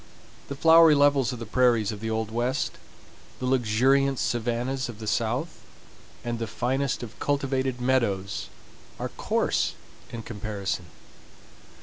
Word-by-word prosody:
The 140 - -5
flowery 165 +1 +7
levels 140 -4 +3
of 125 - -5
the 115 - -6
prairies 115 -2 +2
of 105 - -7
the 110 +1 -4
old 110 -1 -2
West, 120 +4 -1 0.6
the 130 - -4
luxuriant 130 +3 +2
savannahs 120 +3 -1
of 115 - -8
the 110 - -8
South, 120 +9 -1 0.7
and 120 -1 -2
the 115 - -3
finest 130 +4 -1
of 115 -2 -10
cultivated 135 -3 -1
meadows 115 -7 0 0.5
are - - -4
coarse - - 0 0.4
in 115 -1 -6
comparison. 100 -5 -4
120 Hz, 130 wpm, -26 LUFS, 110-135 Hz, 0.7 s, flowery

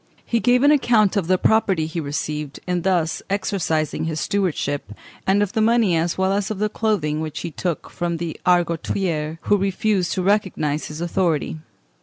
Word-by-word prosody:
He 235 - +1
gave 245 +2 +3
an 290 - +6
account 230 -8 +3
of 195 -5 0
the 185 0 +3
property 195 -6 +2
he 160 +2 -4
received 150 -1 -4
in 180 -1 -1
thus 175 -3 0
exercising 170 -7 -1
his 160 -1 -2
stewardship, 145 - -1 0.3
and 200 +2 +4
of 205 - -4
the 220 - +1
money 225 -5 +3
as 165 +1 0
well 190 +1 +2
as 200 -1 -1
of 215 - -3
the 210 +2 0
clothing 180 -10 0
which 155 -1 -4
he 170 - -5
took 170 +2 -3
from 175 -2 -2
the 165 -1 -4
Argotiers 170 -2 0
who 205 - +2
refused 195 -1 0
to 185 - -1
recognise 180 -7 0
his 155 +2 -7
authority. 170 -3 0
180 Hz, 180 wpm, -22 LUFS, 160-205 Hz, 0.3 s, an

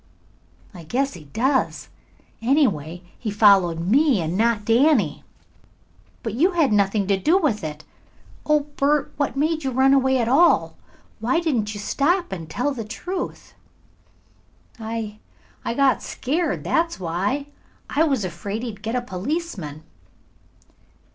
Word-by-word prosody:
"I 175 -3 -10
guess 270 - -1
he 160 -4 -11
does. 260 - -1 0.5
Anyway, 185 - +1 0.2
he 225 - -3
followed 200 -5 +4
me 255 - +3
and 165 +1 -2
not 220 0 +1
Danny." 235 - +3 1.0
"But 225 - -3
you 340 - +2
had 315 -10 +2
nothing 200 0 +2
to 195 0 +2
do 315 - +3
with 285 - 0
it. 155 -1 -6 0.6
Oh, 300 -1 +3
Bert, 290 0 0
what 285 -2 -1
made 315 +2 0
you 265 - 0
run 265 +2 +3
away 265 -1 +3
at 235 -2 0
all. 305 +8 +4 0.4
Why 245 +8 +1
didn't 235 -11 -1
you - - -6
stop 340 - 0
and 165 -4 -6
tell 255 - -1
the 235 -4 -5
truth?" 350 - -6 1.3
"I 220 -1 -5 0.4
I 235 - -2
got 275 0 +3
scared, 310 +5 -2
that's 330 - 0
why. 190 - -1 0.4
I 295 - 0
was 275 -10 +2
afraid 200 +6 -5
he'd 215 -4 -6
get 225 +2 -3
a 250 - -1
policeman." 190 - -4
235 Hz, 140 wpm, -23 LUFS, 200-290 Hz, 1.3 s, followed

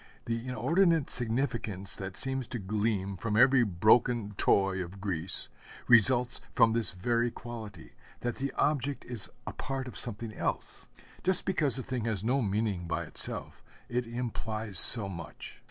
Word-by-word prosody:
The 115 +1 -4
inordinate 165 +4 +1
significance 115 -6 -1
that 95 -1 -6
seems 135 -2 0
to 125 - -6
gleam 100 -1 -2
from 105 +3 -3
every 130 +1 +5
broken 110 +3 +2
toy 95 -1 +1
of 90 +3 -11
Greece, 95 -3 +1 0.4
results 120 +1 +5
from 115 -1 +4
this 115 -4 +1
very 115 +6 -1
quality 110 -7 -10 0.3
that 120 -1 -4
the 135 0 -3
object 145 -2 -1
is 120 -5 -3 0.2
a - - -6
part 135 -1 -5
of 125 - -10
something 115 -1 -5
else. - - -5 0.4
Just 185 0 +4
because 150 -9 +1
the 130 - +1
thing 125 -3 -4
has 105 -4 -3
no 130 +4 0
meaning 100 -4 -2
by - - -3
itself, - - -2 0.3
it 120 0 -2
implies 110 -4 -1
so 115 -5 +9
much. 85 -5 -10
115 Hz, 155 wpm, -29 LUFS, 100-125 Hz, 0.4 s, so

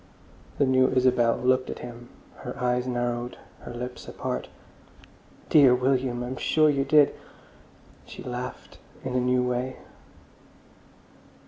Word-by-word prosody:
The 140 - +3
new 130 0 +4
Isabel 125 -2 +3
looked 130 +1 +1
at - - -5
him, 120 0 -10 0.3
her - - -7
eyes 125 0 0
narrowed, 120 0 -2 0.2
her - - -9
lips 125 +1 -7
apart. - - -4 1.0
"Dear 135 -5 +6
William! 125 -1 0
I'm 125 +1 -5
sure 155 -1 +3
you 140 -1 +1
did!" 145 +1 +5 0.9
She - - -10
laughed 125 0 -7 0.2
in 130 - -4
the 125 - +2
new 125 0 +2
way. 125 +1 -2
125 Hz, 125 wpm, -26 LUFS, 125-130 Hz, 1.0 s, Dear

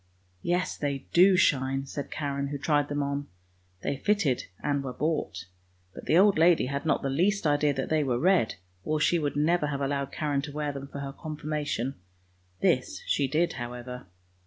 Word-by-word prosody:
" 90 0 -38
Yes, 180 +1 -1
they 140 -2 -3
do 185 +2 +6
shine," 135 -4 +2
said 140 +1 -6
Karen, 140 -2 -2
who 145 +1 -4
tried 145 +1 +1
them 145 0 -1
on. 140 0 -3 0.6
They 140 - -1
fitted 170 -7 +1 0.2
and 145 -1 0
were 130 -2 -4
bought; 140 - -2 0.5
but - - -10
the 160 - +4
old 195 -2 +5
lady 170 -2 +5
had 140 +4 -3
not - - +1
the 135 - 0
least 190 +7 +1
idea 145 0 +3
that 135 - -2
they 155 -1 +2
were 125 -4 0
red, 175 -4 +3 0.3
or 155 0 0
she 170 +3 +3
would 145 -2 -2
never 150 +1 +2
have 140 -1 -2
allowed 140 0 -1
Karen 145 -2 -1
to 145 - -6
wear 150 0 -2
them 140 0 -7
for 140 0 -7
her 135 -1 -5
Confirmation. 150 -4 -3 0.7
This - - +1
she 140 - +1
did 160 +5 +1
however. 125 0 -7
145 Hz, 190 wpm, -28 LUFS, 135-155 Hz, 0.7 s, do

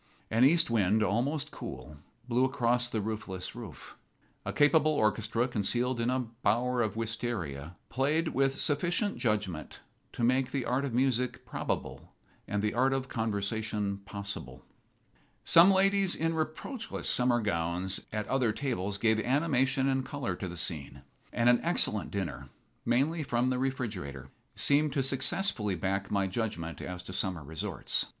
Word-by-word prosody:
An 115 +3 +4
east 155 -1 +5
wind, 110 -1 +3
almost 125 - 0
cool, 75 - -8 0.3
blew 125 +1 +2
across 125 -2 +1
the 110 -3 -1
roofless 100 -4 -4
roof. - - -9 0.5
A - - -2
capable 155 +1 +4
orchestra 110 -1 +1
concealed 120 +2 0
in 115 - +1
a 130 0 +1 0.2
bower 125 +3 +2
of 110 -3 -1
wistaria 110 - -3
played 150 +6 +1
with 135 0 +1
sufficient 175 +7 0
judgment 105 - -2 0.3
to - - -3
make 130 +2 +3
the 135 -3 -2
art 130 +3 0
of 135 - -3
music 125 -1 +1
probable - - -4 0.3
and 105 0 -1
the 105 - +1
art 130 +3 +3
of 135 0 -2
conversation 105 -2 -1
possible. 100 0 -7 0.8
Some 170 +3 +8
ladies 195 0 +3
in 165 +1 0
reproachless 160 - -4
summer 125 -1 +4
gowns 90 -2 0
at 105 0 -3
other 130 -4 +2
tables 105 -6 -2
gave 110 +1 +3
animation 135 0 +2
and 135 -1 +1
color 130 -8 -3
to 95 - -5
the 85 0 -7
scene. 70 -6 -3 0.3
And 115 - +1
an 120 0 +6
excellent 135 -11 +1
dinner, 70 -9 -4 0.4
mainly 140 +8 +2
from 125 -2 +1
the 125 - 0
refrigerator, 100 - -3 0.3
seemed 145 0 +3
to 135 - +1
successfully 135 - 0
back 95 +3 -2
my 100 -1 +1
judgment 95 -5 -3
as 90 0 -6
to 95 - -8
summer 90 -4 -1
resorts. 80 +2 -2
120 Hz, 150 wpm, -30 LUFS, 100-135 Hz, 0.8 s, Some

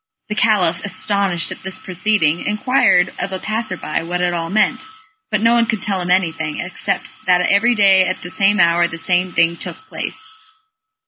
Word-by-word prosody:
The - - -2
Caliph, 195 -6 +1
astonished 195 -2 0
at - - -8
this 190 0 -3
proceeding, 185 -3 0
inquired 210 -4 +2
of 195 - -3
a 190 - -3
passer 215 -1 -3
by 155 - -3
what 175 +2 -3
it 180 0 0
all 165 -1 -3
meant, 215 +6 +1 0.4
but 210 -2 0
no 230 +1 +4
one 235 -1 +2
could 220 -4 -2
tell 195 -3 -2
him 175 - -4
anything, 160 -4 0
except 180 - -3 0.2
that 180 -1 +4
every 210 +6 +3
day 195 -3 +5
at 185 - -4
the 180 - -6
same 195 +2 +2
hour 170 0 +4
the 170 - -8
same 180 +2 +1
thing 165 0 +1
took - - -6
place. 435 0 -6
185 Hz, 190 wpm, -18 LUFS, 175-210 Hz, 0.4 s, day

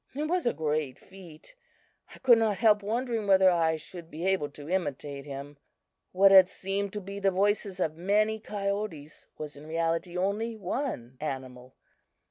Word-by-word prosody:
It 295 - -2
was 345 -1 0
a - - +4
great 150 -3 -2
feat! 185 - -14 0.6
I - - -13
could 245 -3 +5
not 215 -3 +1
help 210 -1 +4
wondering 225 +1 -2
whether 190 -1 +6
I 165 -2 +2
should 165 +2 -9
be 165 +3 -6
able 190 -6 +1
to 145 0 -11
imitate 145 -5 -3
him. 140 0 -8 0.5
What 195 +1 +5
had 190 -1 +8
seemed 195 +1 -3
to 210 - -4
be 200 +1 -7
the 195 -1 +3
voices 195 0 0
of 155 -3 0
many 210 +5 +1
coyotes 200 -8 -4
was 150 -2 -6
in 145 +2 -12
reality 165 +2 -1
only 210 +5 -1
one 180 - -4
animal. 130 -3 -6
185 Hz, 165 wpm, -28 LUFS, 155-205 Hz, 0.6 s, had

